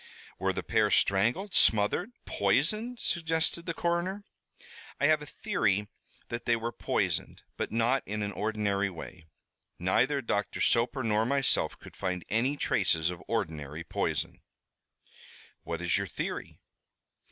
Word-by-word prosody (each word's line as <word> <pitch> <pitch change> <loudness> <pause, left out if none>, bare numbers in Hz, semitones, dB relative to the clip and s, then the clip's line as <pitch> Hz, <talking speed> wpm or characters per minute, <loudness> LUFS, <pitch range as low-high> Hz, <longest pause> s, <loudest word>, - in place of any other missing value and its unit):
"Were - - +1
the - - -4
pair - - +2
strangled, 120 - +2
smothered, 110 - +4 0.2
poisoned?" 235 +3 +1
suggested 165 0 0
the 170 - -1
coroner. 175 +4 -1 0.8
"I 145 - +3
have 155 0 +4
a 150 - -8
theory 105 - 0 0.4
that 120 0 -4
they 120 - +4
were 115 +1 -3
poisoned, - - -1
but - - -3
not 120 +4 +2
in 105 +1 -2
an 100 - -2
ordinary 100 -2 0
way. 85 -2 -10 0.5
Neither 125 +11 +2
Doctor 105 -3 -1
Soper 125 +3 +3
nor 110 -1 +2
myself 140 0 +2
could - - -13
find 90 -2 -3
any 125 +8 +1
traces 80 - +2
of 85 -3 -8
ordinary 75 0 -3
poison." - - -2 1.2
"What 85 0 -4
is 90 +3 +2
your 100 - -2
theory?" - - -5
115 Hz, 135 wpm, -30 LUFS, 100-150 Hz, 1.2 s, smothered